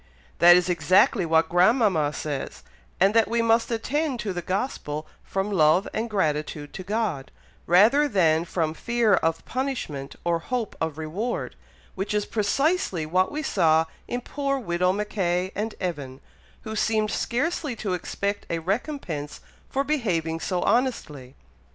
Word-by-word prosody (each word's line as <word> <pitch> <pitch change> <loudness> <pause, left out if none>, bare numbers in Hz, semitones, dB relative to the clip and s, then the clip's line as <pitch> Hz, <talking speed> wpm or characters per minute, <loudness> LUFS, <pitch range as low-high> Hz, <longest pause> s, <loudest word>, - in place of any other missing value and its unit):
"That 175 +1 +9
is 180 0 +2
exactly 180 +2 +3
what 160 0 +3
grandmama 180 - +3
says, 145 -2 -5 0.4
and 195 +3 +4
that 225 -2 +4
we 230 +1 +1
must 230 0 +3
attend 260 +4 -1
to 200 -3 -3
the 175 - -3
Gospel 170 - -3 0.2
from 195 +2 -2
love 165 +1 +4
and 225 +2 -2
gratitude 150 -6 -2
to - - -6
God, 200 -9 -2 0.4
rather 225 +12 +5
than 165 - +3
from 160 -3 -1
fear 235 +3 +1
of 165 -2 +1
punishment 245 - -4
or 170 -1 +1
hope 235 +4 -3
of 160 -2 -2
reward, 180 +10 -3 0.4
which 195 +2 -3
is 210 0 +1
precisely 225 - 0
what 185 +4 +1
we 305 +1 -3
saw 160 - +3 0.2
in 245 - -3
poor 275 +1 -2
widow 180 -6 0
Mackay 190 -3 -1
and 215 +2 -3
Evan, 145 -8 -4 0.4
who 220 0 -5
seemed 215 -1 +1
scarcely 285 +1 -1
to 200 -4 -3
expect 200 +3 -3
a 170 - -1
recompense 180 - -3 0.3
for 275 - 0
behaving 180 - -1
so 180 +1 -2
honestly." 160 - -1
190 Hz, 145 wpm, -25 LUFS, 165-230 Hz, 0.4 s, That